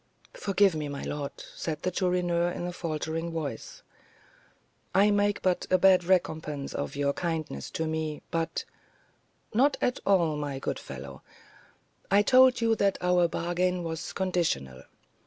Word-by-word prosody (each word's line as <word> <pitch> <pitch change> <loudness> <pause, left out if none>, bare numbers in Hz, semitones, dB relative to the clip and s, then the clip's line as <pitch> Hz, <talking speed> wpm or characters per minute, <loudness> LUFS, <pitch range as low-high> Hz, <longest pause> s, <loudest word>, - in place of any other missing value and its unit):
"Forgive 195 -1 +2
me, 155 -2 -3
my 140 -1 -5
lord," 145 -1 -4 0.2
said 155 -2 -4
the 185 - 0
Chourineur, 175 -2 +1
in 175 - -4
a 175 - -4
faltering 165 0 -3
voice; 150 -8 -5 1.1
"I 200 +2 +5
make 205 0 +1
but 185 -1 +1
a 185 - +5
bad 185 -1 +5
recompense 160 -6 0
for - - -5
all - - -2
your 140 0 -1
kindness 160 - -3
to 160 - -3
me, 155 -1 -3
but 165 -1 -2 0.4
" - - -34
"Not 270 +6 +3
at 250 - 0
all, 170 -6 +3
my 145 -2 -3
good 135 - -3
fellow; - - -9 0.9
I 200 +1 +5
told 255 +1 +6
you 225 -1 +3
that 200 -1 +2
our 180 -1 +3
bargain 175 +2 -1
was 160 -1 -4
conditional. 160 - -1
175 Hz, 155 wpm, -28 LUFS, 155-190 Hz, 1.1 s, told